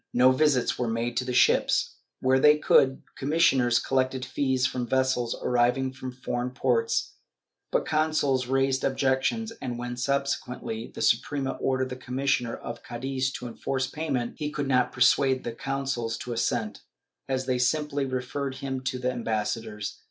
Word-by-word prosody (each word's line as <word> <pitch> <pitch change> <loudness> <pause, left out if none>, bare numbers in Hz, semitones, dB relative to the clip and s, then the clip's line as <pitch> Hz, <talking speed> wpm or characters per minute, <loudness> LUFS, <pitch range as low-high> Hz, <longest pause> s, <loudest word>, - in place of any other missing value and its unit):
No 125 +1 +6
visits 130 -2 +2
were 125 - 0
made 115 +1 -2
to 125 - 0
the 125 - -3
ships. 125 - +3 0.2
Where 130 +1 +3
they 150 +2 +6
could, 135 -3 +3 0.2
commis 155 +5 +1
sioners 120 -3 +2
collected 130 -1 0
fees 130 0 0
from 125 -2 -2
vessels 130 -2 +1
arriving 125 +2 +2
from 130 -1 -6
foreign 125 -1 -3
ports, 125 -3 0 0.6
but - - +1
consuls 155 -5 +1
raised 135 0 +1
objections 135 - 0
and, 125 -3 -4
when 120 0 -4
subsequently 125 -3 -2
the - - -6
Suprema 135 +3 +1
ordered 130 -1 -1
the 125 - -5
commissioner 130 -2 -1
of 120 0 -7
Cadiz 130 +2 -2
to 125 - -6
enforce 130 +3 -2
payment, 135 -4 -3
he 150 -1 -2
could 145 -2 -3
not 130 -2 +2
persuade 130 +1 +3
the 120 - -3
consuls 135 -2 -3
to 120 - -5
assent, 115 -2 -1 0.5
as 130 -1 -1
they 125 -1 0
simply 145 +2 +1
referred 130 +1 -3
him 135 -1 -4
to 130 - -1
their 125 0 -1
ambassadors. 110 -2 -3
130 Hz, 160 wpm, -27 LUFS, 120-135 Hz, 0.6 s, No